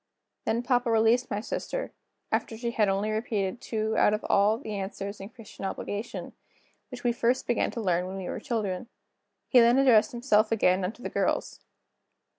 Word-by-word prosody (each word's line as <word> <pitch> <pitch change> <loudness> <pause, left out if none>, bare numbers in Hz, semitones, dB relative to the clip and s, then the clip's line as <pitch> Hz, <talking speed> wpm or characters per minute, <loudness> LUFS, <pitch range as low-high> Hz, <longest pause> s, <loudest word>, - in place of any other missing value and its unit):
Then 225 +2 0
papa 245 -1 +1
released 225 +2 +3
my 205 - -2
sister, - - -4 0.4
after 225 - -1
she 235 +1 -2
had 215 -3 +2
only 200 +2 0
repeated 215 -1 -2
two 220 -1 -2
out 210 - +4
of 210 - -7
all 205 +2 +3
the 220 -4 -7
answers 200 0 -5
in 195 +1 -8
Christian 225 -4 -12
Obligation, 205 +3 -5 0.6
which 250 -3 -9
we 240 - +3
first 240 +2 +1
began 240 - +1
to 235 - -5
learn 180 -3 +1
when 190 +1 -6
we 190 -2 -5
were - - -4
children. 220 -4 -3 0.6
He 255 - +6
then 235 +2 +5
addressed 255 -6 +5
himself 235 -3 +2
again 185 -3 +2
to 240 - -18
the - - -3
girls. - - -1
220 Hz, 180 wpm, -28 LUFS, 200-240 Hz, 0.6 s, He